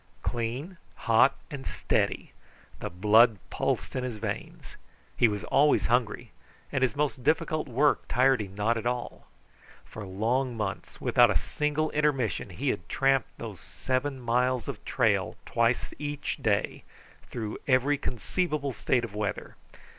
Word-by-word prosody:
Clean, 125 +10 -3 0.2
hot, 115 +4 +4 0.2
and 140 -2 -6
steady - - -1 0.5
the - - -4
blood 105 +5 +5
pulsed - - -1
in 130 - -1
his 125 -4 -4
veins. 105 -1 -6 0.4
He 120 - +5
was 105 -3 -3
always 145 +1 +3
hungry, 120 -2 0 0.4
and 135 - -1
his 130 +1 +2
most 140 -3 -1
difficult 155 +1 +1
work 135 +4 +2
tired 130 0 +3
him 100 -2 -8
not 110 +3 +1
at 115 +1 -2
all. 125 0 -4 0.6
For 110 - -9
long 115 +6 -1
months, 100 -4 -4
without - - +5
a - - +3
single 150 +1 -1
intermission, 140 -8 0
he - - -2
had 85 - -3
tramped 135 -3 +1
those - - -7
seven 130 +1 -2
miles 125 +1 +1
of - - -6
trail - - +1
twice 115 +1 +1
each 145 -1 -3
day, 105 -3 0 0.5
through 110 -3 -5
every 135 +2 +3
conceivable 145 - -2
state 125 +1 +1
of 115 -4 -5
weather. 105 -1 -3
125 Hz, 145 wpm, -28 LUFS, 110-140 Hz, 0.6 s, blood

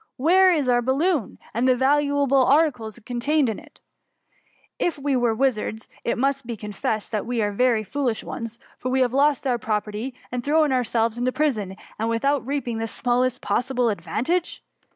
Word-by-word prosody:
Where' 365 +7 +5
is 300 -6 +1
our 245 -1 +3
baUoon, 270 - 0 0.2
and 240 +3 +1
the 255 - +5
valuable 280 0 +3
articles 265 -7 +2
it 230 - -19
contained? 260 +3 +1
I£ 295 - -8
we 285 0 -1
ate 240 -3 +1
wizards, 220 -4 -1 0.2
it - - -1
must 275 0 0
be 235 -2 -4
confessed 210 +1 -3
that 215 -1 -2
we 245 -1 -1
are 205 - 0
very 230 +1 +2
foolish 250 -1 -2
ones; 230 0 -6 0.2
for 255 - -3
we 260 +1 +2
have 250 -1 +2
lost 285 0 +2
our 245 -3 +1
property, 215 +3 -3 0.2
and 245 0 -3
thrown 300 +1 +3
ourselves 230 -2 0
into 250 +1 +1
prison, 220 -11 -1 0.3
without 245 +5 +1
reap 280 -1 -2
ing 230 -2 -2
the 225 - -2
smallest 250 +3 0
possible 245 +3 0
advantage? 240 - -2
250 Hz, 170 wpm, -23 LUFS, 225-280 Hz, 0.3 s, Where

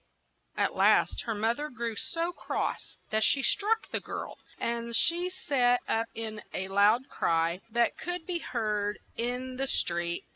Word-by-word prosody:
At - - +1
last - - +3
the 225 - 0
moth 225 +5 0
er 300 +1 -3
grew 235 -3 -3
so 335 +10 -1
cross - - -3
that 220 0 +2
she 270 +4 +4
struck 440 +8 +2
the - - 0
girl, - - -6 0.2
and 235 0 -1
she 345 +6 +4
set 250 -9 +2
up 225 +1 0
in 220 -1 -4
a 190 0 -2
loud 210 +6 +4
cry 165 +2 0
that 235 +1 +1
could 355 -1 -4
be 355 -2 -2
heard 210 -6 -1 0.2
in 250 +2 -3
the 270 +1 0
street. 170 -7 0
235 Hz, 160 wpm, -29 LUFS, 210-275 Hz, 0.2 s, she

